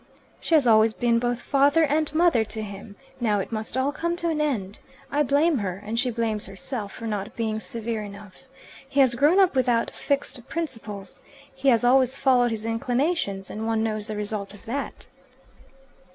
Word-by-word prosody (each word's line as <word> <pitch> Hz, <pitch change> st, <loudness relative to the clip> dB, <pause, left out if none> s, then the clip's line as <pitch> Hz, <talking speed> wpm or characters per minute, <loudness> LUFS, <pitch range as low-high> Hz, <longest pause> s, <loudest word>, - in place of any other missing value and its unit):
"She 330 Hz, -, +1 dB
has 295 Hz, -4 st, +5 dB
always 220 Hz, -1 st, +5 dB
been 235 Hz, -1 st, +2 dB
both 245 Hz, 0 st, -2 dB
father 285 Hz, +3 st, +3 dB
and 300 Hz, +1 st, +1 dB
mother 330 Hz, -8 st, +4 dB
to 220 Hz, 0 st, -6 dB
him. 200 Hz, 0 st, -9 dB, 0.2 s
Now 215 Hz, -4 st, +1 dB
it 195 Hz, -, -3 dB
must 220 Hz, +2 st, -4 dB
all 265 Hz, +2 st, +1 dB
come 340 Hz, +3 st, -2 dB
to 340 Hz, -1 st, -1 dB
an 310 Hz, -2 st, 0 dB
end. 210 Hz, -10 st, -2 dB, 0.3 s
I 290 Hz, -, +2 dB
blame 290 Hz, +1 st, +3 dB
her 185 Hz, -3 st, -3 dB
and 225 Hz, +2 st, -2 dB
she 255 Hz, 0 st, +1 dB
blames 225 Hz, -3 st, -1 dB
herself 200 Hz, +2 st, -5 dB
for 230 Hz, -, -8 dB
not 205 Hz, -3 st, -4 dB
being 220 Hz, -2 st, -1 dB
severe 220 Hz, +3 st, -4 dB
enough. 205 Hz, +2 st, -11 dB, 0.4 s
He 275 Hz, -, 0 dB
has 260 Hz, -3 st, +6 dB
grown 295 Hz, +10 st, +4 dB
up 375 Hz, -6 st, +4 dB
without 245 Hz, -3 st, +2 dB
fixed 275 Hz, -3 st, -3 dB
principles. 220 Hz, -, -5 dB, 0.3 s
He 270 Hz, +1 st, +1 dB
has 235 Hz, -3 st, +4 dB
always 260 Hz, +1 st, +4 dB
followed 250 Hz, -2 st, +3 dB
his 220 Hz, -1 st, -4 dB
inclinations, 230 Hz, -, -1 dB
and 220 Hz, +1 st, -4 dB
one 225 Hz, -1 st, +1 dB
knows 215 Hz, -1 st, -2 dB
the 215 Hz, -, -4 dB
result 205 Hz, -1 st, -3 dB
of 205 Hz, -, -17 dB
that." 275 Hz, +5 st, -5 dB
235 Hz, 185 wpm, -25 LUFS, 215-275 Hz, 0.4 s, has